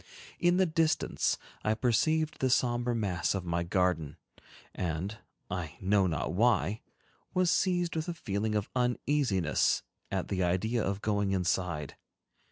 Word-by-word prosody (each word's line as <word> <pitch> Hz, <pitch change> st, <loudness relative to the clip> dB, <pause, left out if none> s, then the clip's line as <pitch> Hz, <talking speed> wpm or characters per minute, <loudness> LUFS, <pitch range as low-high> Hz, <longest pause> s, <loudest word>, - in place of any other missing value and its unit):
In 175 Hz, +1 st, +3 dB
the 190 Hz, -, +4 dB
distance, 160 Hz, -1 st, +1 dB, 0.3 s
I 110 Hz, +1 st, +2 dB
perceived 155 Hz, +7 st, +1 dB
the 130 Hz, -, +2 dB
somber 120 Hz, -1 st, +1 dB
mass 95 Hz, -6 st, 0 dB
of 95 Hz, -2 st, -3 dB
my 85 Hz, 0 st, 0 dB
garden, 85 Hz, -4 st, 0 dB, 0.6 s
and, 90 Hz, +5 st, -3 dB, 0.3 s
I 90 Hz, -4 st, -5 dB
know 95 Hz, 0 st, +3 dB
not 80 Hz, 0 st, -2 dB
why, 110 Hz, 0 st, +2 dB, 0.5 s
was 180 Hz, -2 st, +3 dB
seized 175 Hz, -3 st, +1 dB
with 160 Hz, +1 st, -2 dB
a 175 Hz, -, -3 dB
feeling 105 Hz, -5 st, -2 dB
of 105 Hz, -2 st, -1 dB
uneasiness 125 Hz, -, +1 dB, 0.3 s
at -, -, -2 dB
the 95 Hz, -1 st, -1 dB
idea 105 Hz, +6 st, +1 dB
of 100 Hz, +1 st, -2 dB
going 100 Hz, -2 st, +1 dB
inside. 85 Hz, -5 st, -1 dB
105 Hz, 140 wpm, -30 LUFS, 90-130 Hz, 0.6 s, the